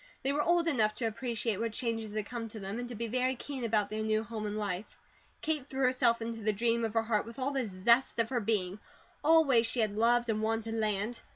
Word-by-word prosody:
They 270 +1 +1
were 295 - +1
old 340 +1 +2
enough 220 -9 +2
to 235 - -2
appreciate 225 -1 -1
what 230 -1 -2
changes 225 -3 -2
had 215 -1 -1
come 235 0 -5
to 220 0 -9
them, 200 +3 -5
and 245 0 -5
to 245 - -6
be 230 +2 -3
very 255 +3 +1
keen 265 +1 -6
about 215 -3 +1
their 215 0 -2
new 215 0 +1
home 215 -1 -5
and 210 +1 -3
life. 200 -1 -4 0.5
Kate 305 -4 -1
threw 270 0 -3
herself 250 -2 +3
into 230 0 -4
the 215 0 +2
dream 230 +2 +1
of 225 0 -2
her 225 - +3
heart 220 -2 +1
with 230 - -10
all 270 +1 -1
the 265 -4 -1
zest 235 +7 +2
of 230 -1 +2
her 250 -3 0
being. 200 -3 -1 0.4
Always 290 -8 +5
she 245 - -2
had 210 -2 0
loved 240 +2 +3
and 215 -1 0
wanted 225 0 -1
land. 215 +1 -1
230 Hz, 245 wpm, -31 LUFS, 215-245 Hz, 0.5 s, Always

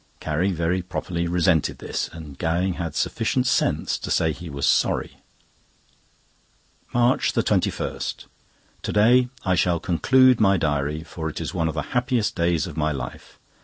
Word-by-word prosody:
Carrie 80 +6 0
very 85 +1 0
properly 85 -1 -3
resented 85 -2 +2
this, - - -3
and 80 -4 -10
Gowing 90 +3 0
had 80 -3 -4
sufficient - - 0
sense - - +1
to - - -6
say 80 - +2
he 85 +2 -8
was 70 -1 -2
sorry. - - +1 1.7
MARCH 120 +1 +2
21.—To - - -3
day 120 +4 +4 0.2
I 95 - +2
shall 90 -1 +2
conclude 130 +8 +4
my 100 -2 +4
diary, 75 -1 -1
for 80 -1 -5
it - - -6
is 85 +1 -4
one 85 -3 0
of 80 - -3
the 75 - -1
happiest 125 -3 +1
days 85 -3 +1
of 80 - -8
my 75 0 0
life. 70 - -7
85 Hz, 150 wpm, -23 LUFS, 80-95 Hz, 1.7 s, day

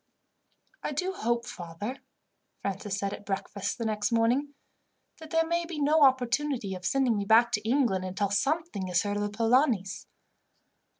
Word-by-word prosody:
"I - - -3
do 365 +7 -1
hope, 235 - -1
father," 190 +7 -6 0.6
Francis 200 0 -3
said 200 -1 -2
at - - -8
breakfast 200 0 -3
the 230 - -3
next 215 0 -1
morning, 245 +6 +1 0.6
"that 320 -1 -10
there 325 +1 +2
may 340 +1 0
be 335 -2 -6
no 300 +2 +3
opportunity 260 -4 +2
of 185 -1 -7
sending 255 +2 +2
me 200 -1 -1
back 225 +3 +5
to 210 +1 -1
England, 240 -8 +2
until 190 +2 -2
something 275 - 0
is 180 -1 +2
heard 205 0 -2
of - - -1
the 205 - -1
Polanis." 225 - +1
230 Hz, 165 wpm, -28 LUFS, 200-280 Hz, 0.6 s, back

